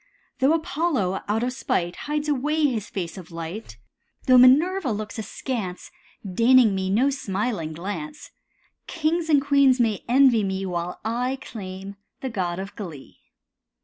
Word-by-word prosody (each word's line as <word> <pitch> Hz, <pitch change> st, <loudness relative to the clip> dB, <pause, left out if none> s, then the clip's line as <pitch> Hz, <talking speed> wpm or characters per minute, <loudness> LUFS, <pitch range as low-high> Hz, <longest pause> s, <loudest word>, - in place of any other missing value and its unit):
Though 270 Hz, +4 st, +4 dB
Apollo, 300 Hz, -, 0 dB
out 215 Hz, +3 st, 0 dB
of 250 Hz, +1 st, -1 dB
spite, 175 Hz, -8 st, -1 dB
Hides 300 Hz, 0 st, -3 dB
away 300 Hz, +2 st, +1 dB
his 230 Hz, -7 st, -1 dB
face 185 Hz, -1 st, -5 dB
of 175 Hz, -, -12 dB
light, 165 Hz, -, -7 dB, 0.5 s
Though 255 Hz, -1 st, +7 dB
Minerva 290 Hz, +5 st, +5 dB
looks 215 Hz, +1 st, -4 dB
askance, 215 Hz, -4 st, -5 dB, 0.3 s
Deigning 230 Hz, +3 st, +5 dB
me 190 Hz, -1 st, -1 dB
no 245 Hz, +8 st, +3 dB
smiling 195 Hz, -, -2 dB
glance, 205 Hz, -, -6 dB, 0.6 s
Kings 325 Hz, 0 st, -1 dB
and 295 Hz, -2 st, +6 dB
queens 280 Hz, -2 st, +4 dB
may 220 Hz, -4 st, +1 dB
envy 250 Hz, -3 st, +5 dB
me 190 Hz, 0 st, -2 dB
While 175 Hz, -1 st, -4 dB
I 250 Hz, +4 st, -1 dB
claim 195 Hz, -3 st, -8 dB, 0.2 s
the 265 Hz, -, -3 dB
god 180 Hz, -5 st, -2 dB
of 195 Hz, +1 st, -6 dB
glee. 165 Hz, -10 st, -9 dB
230 Hz, 145 wpm, -24 LUFS, 190-275 Hz, 0.6 s, Though